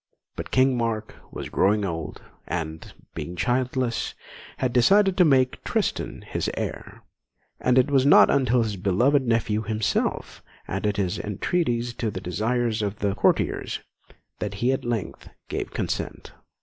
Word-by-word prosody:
But - - -6
King 130 0 +3
Mark 115 -2 -2 0.2
was - - -6
growing 105 +1 +2
old, 80 -4 -5 0.2
and, 80 -2 -4 0.2
being 90 - -6
childless, 125 +4 -1 0.4
had 125 -2 -1
decided 195 - +5
to 180 - +6
make 130 -4 +2
Tristan - - -2
his - - -2
heir: - - -5 0.6
and 125 0 +2
it 130 +3 +4
was 135 -2 +4
not 140 - +7
until 125 -3 +3
his 105 -3 -3
beloved 120 +9 +2
nephew 110 -2 +1
himself 110 0 -1 0.3
added 100 +2 -1
his 95 0 -1
entreaties 120 - -1
to 115 - -1
the 95 - -5
desires 110 +5 -1
of 100 0 -2
the 100 -1 0
courtiers - - +1 0.6
that 100 -1 -3
he 120 +6 +1
at 135 - -1
length 120 -4 -4 0.2
gave - - -3
consent. - - -4
115 Hz, 145 wpm, -25 LUFS, 100-130 Hz, 0.6 s, not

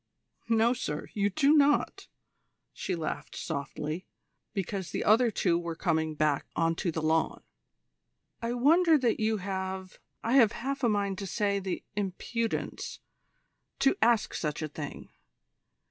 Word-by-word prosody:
"No, 230 +1 +4
sir, 150 -11 -4
you 205 -1 +1
do 275 +9 +4
not," 290 -1 +3 0.7
she 185 - -3
laughed 160 -2 -4
softly, 150 +4 -4 0.4
because 195 -2 -3
the - - -2
other 230 +3 +5
two 175 -5 +1
were 170 -1 -4
coming 160 -2 0
back 150 -2 +1
on 165 0 +2
to 175 - -1
the 160 -1 -3
lawn. 160 +1 +1 1.0
"I 230 +1 -1
wonder 320 +6 +5
that 245 -5 +1
you 220 0 +1
have 190 -1 -4 0.2
I 230 - 0
have 230 -5 +6
half 275 +2 -4
a 240 - +4
mind 200 -2 0
to 200 - -4
say 200 +1 0
the 190 -2 -4
impudence 210 +3 -3 0.8
to 270 - +3
ask 230 -1 +3
such 150 0 -2
a - - -1
thing. 145 -1 -8
200 Hz, 145 wpm, -29 LUFS, 165-230 Hz, 1.0 s, have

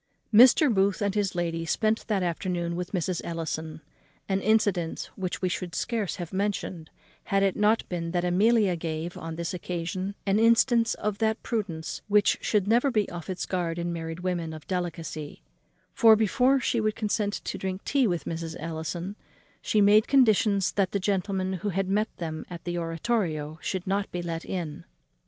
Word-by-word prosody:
Mr. 250 +4 +7
Booth 195 -1 +2
and 200 -2 0
his 200 -3 0
lady 165 -1 -1
spent 215 +6 0
that 205 -4 +1
afternoon 175 0 -2
with 180 0 -4
Mrs. 180 -2 -1
Ellison 160 -1 -4 0.5
an 195 0 0
incident 205 -6 +1
which 185 0 -4
we - - +3
should 175 -1 -4
scarce 225 -5 -1
have 175 -3 -7
mentioned, 190 -4 -2 0.4
had 195 0 +2
it 195 -2 +2
not 210 +2 +2
been 170 -2 -3
that 175 +1 0
Amelia 200 +1 +3
gave, 165 +1 -4
on 165 0 -6
this 170 +1 -3
occasion, 180 +2 -4
an 200 +1 +2
instance 230 0 +4
of 210 -1 -3
that 220 0 0
prudence 165 - -3
which 205 0 +3
should 205 -3 +1
never 240 +5 +4
be 215 -5 +1
off 175 0 -7
its 185 - -3
guard 175 -3 -2
in 170 0 -2
married 165 0 -5
women 175 -3 -2
of 155 -1 -10
delicacy; 165 -5 -4 0.5
for, 225 -3 +7
before 250 +5 +3
she 235 -2 0
would 215 0 0
consent 210 -1 -1
to - - -5
drink 190 0 -4
tea 275 -4 +2
with 175 -4 -2
Mrs. 165 0 -4
Ellison, 165 +4 -4 0.5
she 215 - +2
made 210 +2 +5
conditions 215 -7 +4
that 195 -2 0
the 200 - +1
gentleman 190 -1 -1
who 210 - -1
had 195 0 -1
met 210 +3 +1
them 160 -2 -4
at 175 -1 -8
the 175 -1 -3
oratorio 165 -3 -2
should 185 -2 -3
not 195 +1 -1
be 175 -1 -3
let 165 -1 -4
in. 165 -5 -4
185 Hz, 180 wpm, -27 LUFS, 170-210 Hz, 0.5 s, Mr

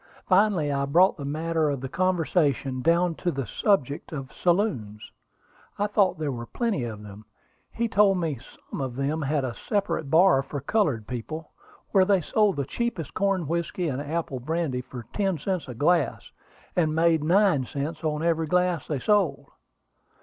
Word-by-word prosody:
Finally 185 -6 +3
I 140 0 0
brought 175 +7 +4
the 140 - -6
matter 160 +1 0
of 140 -2 -2
the 135 - -4
conversation 155 -6 0
down 170 +3 +3
to 175 - -2
the 135 -5 -3
subject 145 - 0
of 135 -4 -6
saloons. 170 - -1 0.7
I 205 - +1
thought 205 -3 +2
there 155 -2 -2
were 120 -2 -6
plenty 225 - -1
of 110 -2 -7
them. 105 +1 -11 0.5
He 235 0 -1
told 200 -2 +4
me 160 -8 -2 0.3
some - - -4
of 130 -2 -4
them 140 +4 -1
had 145 -1 0
a 125 - -3
separate 200 - -2
bar 165 -2 +5
for 140 +1 -6
colored 140 - 0
people, 130 +8 -6 0.4
where 195 -2 +5
they 195 0 +3
sold 210 +4 +2
the 140 - -2
cheapest 190 - -3
corn 195 -3 0
whiskey 170 +1 -2
and 135 0 -3
apple 155 -2 -3
brandy 150 -1 -2
for 125 -2 -9
ten 195 -4 0
cents 180 +3 -3
a 125 - -7
glass, 155 +4 +1 0.4
and 155 -3 +1
made 165 -1 +3
nine 175 -4 +3
cents 150 +3 -4
on 155 0 -1
every 165 -1 +1
glass 180 -2 +1
they 150 - -1
sold." 205 +4 +1
160 Hz, 170 wpm, -26 LUFS, 140-185 Hz, 0.7 s, bar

